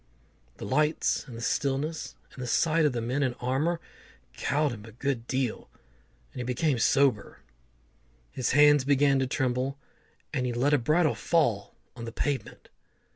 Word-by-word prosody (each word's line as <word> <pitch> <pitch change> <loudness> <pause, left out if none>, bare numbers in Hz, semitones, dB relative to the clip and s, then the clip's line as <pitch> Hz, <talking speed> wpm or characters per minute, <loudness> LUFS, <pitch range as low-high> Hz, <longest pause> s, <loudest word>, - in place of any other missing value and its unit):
The - - -7
lights, 150 0 +1
and 120 -3 -9
the - - -7
stillness, 140 +5 -2 0.2
and 130 - -9
the 125 - -4
sight 160 +6 +2
of - - 0
the 120 -2 -3
men 125 +5 -1
in 130 -3 0
armour, 140 +7 -1 0.5
cowed 150 0 0
him 110 -3 -8
a 110 - -11
good 120 0 -3
deal, 130 -3 -2 0.6
and - - -8
he - - -2
became 125 +2 0
sober. 135 -3 +2 0.9
His 130 - -1
hands 145 -1 +6
began 140 0 +3
to 130 - 0
tremble, 130 +1 -1 0.6
and 130 -3 0
he 120 - -2
let 135 +5 +1
a 145 - +4
bridle 155 +6 +2
fall 120 -12 0 0.2
on 115 -2 -7
the 115 - -6
pavement. 135 -1 -3
135 Hz, 165 wpm, -28 LUFS, 120-145 Hz, 0.9 s, hands